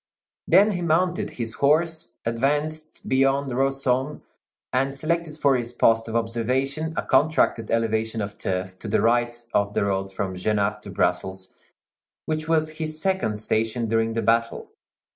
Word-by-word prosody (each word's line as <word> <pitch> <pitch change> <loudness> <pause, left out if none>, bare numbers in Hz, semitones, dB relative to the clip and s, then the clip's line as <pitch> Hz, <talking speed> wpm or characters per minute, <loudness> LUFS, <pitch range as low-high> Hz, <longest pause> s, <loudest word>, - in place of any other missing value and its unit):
Then 200 +5 +6
he 180 -3 -3
mounted 175 +2 +1
his 115 -2 -5
horse, 160 +4 +1
advanced 150 +7 -1
beyond 135 +1 +2
Rossomme, 135 +1 0 0.5
and 135 +2 +1
selected 160 +1 -2
for 140 -3 +3
his 120 -1 -2
post 115 -1 +3
of 115 - -5
observation 130 +7 -1
a - - 0
contracted 145 -7 +2
elevation 110 0 0
of 100 -1 -4
turf 95 0 -3
to - - -6
the 100 - +2
right 120 0 +1
of 100 0 +1
the - - +2
road 95 -1 -1
from 95 -1 -3
Genappe 105 +2 0
to - - -10
Brussels, 95 0 -2 0.7
which 155 0 -2
was 155 -1 0
his 155 -1 -2
second 190 - 0
station 110 +2 -1
during 115 0 +1
the 115 - -1
battle. 115 0 0
120 Hz, 150 wpm, -24 LUFS, 110-155 Hz, 0.7 s, Then